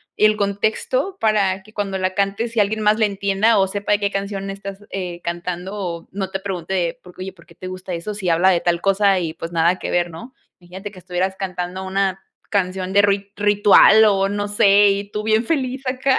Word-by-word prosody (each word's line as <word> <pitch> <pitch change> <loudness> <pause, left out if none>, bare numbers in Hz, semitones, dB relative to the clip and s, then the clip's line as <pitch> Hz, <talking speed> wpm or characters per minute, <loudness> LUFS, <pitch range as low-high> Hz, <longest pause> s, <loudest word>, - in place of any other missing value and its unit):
y - - +3
el 215 0 +4
contexto 220 - -1
para 200 -3 +1
que 215 +2 -19
cuando 195 -2 -2
la 185 0 -1
cantes 200 +4 -1
y 225 - +2
alguien 215 +2 +1
más 215 +1 +3
la 220 - +4
entienda, 200 +2 +1
o, 195 - +3
sepa 205 +2 -1
de 205 - +2
qué 200 -1 -1
canción 195 0 -4
estás, 195 +1 -8
eh, 180 -3 -5
cantando, 175 +3 -4
o, 175 -5 -5
no 195 -1 -4
te 190 - -3
pregunte 190 -2 -5
de: 175 -3 -1
"¿Por 180 - -14
qué, 185 - -10
oye, 190 0 -7
por 170 - -20
qué 170 - -19
te 185 - -8
gusta 185 0 -6
eso 170 +5 -4
si 200 -3 -3
habla 170 +3 +4
de 175 -2 +2
tal 170 -1 +1
cosa, 195 -1 +3
y, 165 -3 -3
pues, 165 0 -7
nada 170 +2 +2
que - - -4
ver", 175 0 +1
¿no? 235 +11 -10 0.3
Imagínate 190 +3 -9
que 185 - -13
estuvieras 185 +1 -2
cantando 185 -1 -4
una 190 0 -1 0.3
canción 190 -1 -1
de 200 - +6
ruit 200 -1 +1
ritual, 205 +1 +6
o, 195 -2 +2
no 205 0 -2
sé, 205 0 +5
y 200 +1 -2
tú 210 0 -3
bien 220 +1 +2
feliz 265 -2 -2
acá. 260 +1 +1
195 Hz, 230 wpm, -20 LUFS, 185-205 Hz, 0.3 s, de